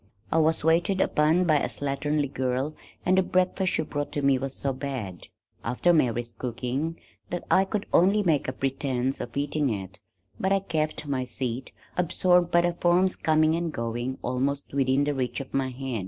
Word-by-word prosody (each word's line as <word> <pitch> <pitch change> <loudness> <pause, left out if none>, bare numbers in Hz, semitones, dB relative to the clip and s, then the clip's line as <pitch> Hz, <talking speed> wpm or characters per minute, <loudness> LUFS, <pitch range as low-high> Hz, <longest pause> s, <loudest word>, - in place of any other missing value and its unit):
I 165 - +3
was 160 0 +2
waited 170 +4 +2
upon 160 +1 +3
by 155 -4 +3
a - - -1
slatternly 145 0 -1
girl 130 +3 -1 0.3
and 185 +1 +4
the - - +5
breakfast 185 +1 +1
she 160 - +1
brought 145 -1 -4
to 145 - -2
me 135 -1 +4
was 135 0 -4
so 135 -1 -1
bad 130 -9 -5 0.4
(after 175 +8 +2
Mary's 120 -6 +1
cooking) 130 +7 -3 0.3
that 175 - -3
I 190 - +5
could 205 +1 -2
only 200 +4 +4
make 160 -6 +2
a - - 0
pretense 135 -1 -1
of 120 +2 -6
eating 145 0 0
it, 100 -1 -5 0.4
but 190 - 0
I 195 - +5
kept 155 -4 -2
my 135 -3 -1
seat, 125 0 -4 0.3
absorbed 180 0 +3
by 175 - +4
the 175 0 +1
forms 180 +2 +2
coming 155 0 +3
and 170 0 -1
going, 120 +1 -3
almost 135 +3 -2
within 135 0 +2
the 145 0 0
reach 130 -3 -2
of 135 - -8
my 135 -1 0
hand. 130 -2 -4
145 Hz, 185 wpm, -26 LUFS, 130-170 Hz, 0.4 s, the